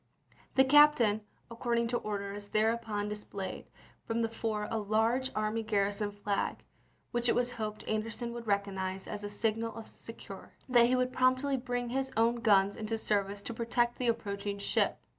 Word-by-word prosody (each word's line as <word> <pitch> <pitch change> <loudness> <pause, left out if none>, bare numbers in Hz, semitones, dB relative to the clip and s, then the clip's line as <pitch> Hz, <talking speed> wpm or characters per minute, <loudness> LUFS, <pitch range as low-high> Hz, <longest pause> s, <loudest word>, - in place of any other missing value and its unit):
The 265 - +7
captain, 265 -7 +6 0.3
according 235 0 0
to 240 - +1
orders, 205 -1 -4
thereupon 215 -1 0
dis 210 0 -4
played 195 -1 -6 0.4
from 230 0 -1
the 225 - 0
fore 220 -2 -2
a 225 - 0
large 225 +5 +1
army 215 +1 0
garrison 205 -1 0
flag 205 0 -2 0.5
which 240 0 0
it - - +3
was 245 0 +1
hoped 215 -3 -5
Anderson 225 +2 -2
would 235 -1 -7
recognize 195 -2 -1
as 210 0 -6
a 205 - -3
signal 225 +2 -1
of 225 -1 -7
succor, - - -10
and 255 - -7
that 235 0 +8
he 255 - +3
would 255 0 0
promptly 255 +2 +2
bring 245 -1 -2
his 265 +2 -1
own 230 +1 +3
guns 200 -3 +4
into 220 +1 -3
service 200 -2 -1
to 235 - -4
protect 240 +1 0
the 250 - 0
approach 205 -3 -2
ing 200 0 -1
ship. 200 - +1
225 Hz, 180 wpm, -31 LUFS, 205-240 Hz, 0.5 s, that